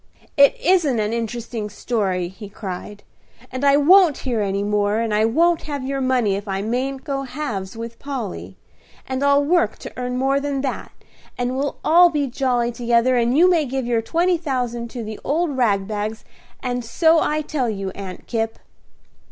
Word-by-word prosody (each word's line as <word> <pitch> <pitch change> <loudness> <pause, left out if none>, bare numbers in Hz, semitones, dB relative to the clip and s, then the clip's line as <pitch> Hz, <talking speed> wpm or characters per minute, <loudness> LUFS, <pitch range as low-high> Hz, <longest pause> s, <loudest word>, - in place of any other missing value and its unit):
"It 280 -1 +5
isn't 315 -8 +2
an 210 +1 -1
interesting 230 -1 -4
story," 195 -4 -1
he 195 +3 -10
cried; 200 0 -7 0.5
"and 260 +2 -4
I 280 0 +5
won't 335 0 +6
hear 240 -4 0
any 200 0 -1
more; 205 0 +1
and 230 -2 -1
I 215 +1 +3
won't 330 +9 +2
have 285 -3 -3
your 275 0 -2
money 250 -6 +1
if 200 +1 -6
I 195 0 -2
mayn't 260 +4 -2
go 275 -2 -2
halves 245 -8 -5
with 230 0 -7
Polly; 95 - -6 0.5
and 260 +1 -2
I'll 280 0 +4
work 290 -9 +2
to - - -9
earn 250 0 -3
more 270 +2 +2
than 280 -1 -2
that, 270 -2 -4 0.5
and 245 +1 -1
we'll 280 +1 -2
all 345 +2 +7
be 295 -3 0
jolly 245 -2 0
together, 235 +1 +2
and 240 +2 +2
you 350 +3 +6
may 345 -4 +3
give 265 -2 -3
your 235 -1 +1
twenty 340 +8 +1
thousand 245 -6 -3
to 240 -1 -6
the 215 -1 -7
old 310 0 0
rag 205 -6 +1
bags, 215 +1 -4 0.4
and 245 -1 -2
so 320 +8 +3
I 305 0 0
tell 285 -5 -2
you, 195 -3 -4
Aunt 190 -2 -8
Kipp." 225 -1 -2
245 Hz, 185 wpm, -21 LUFS, 215-280 Hz, 0.5 s, all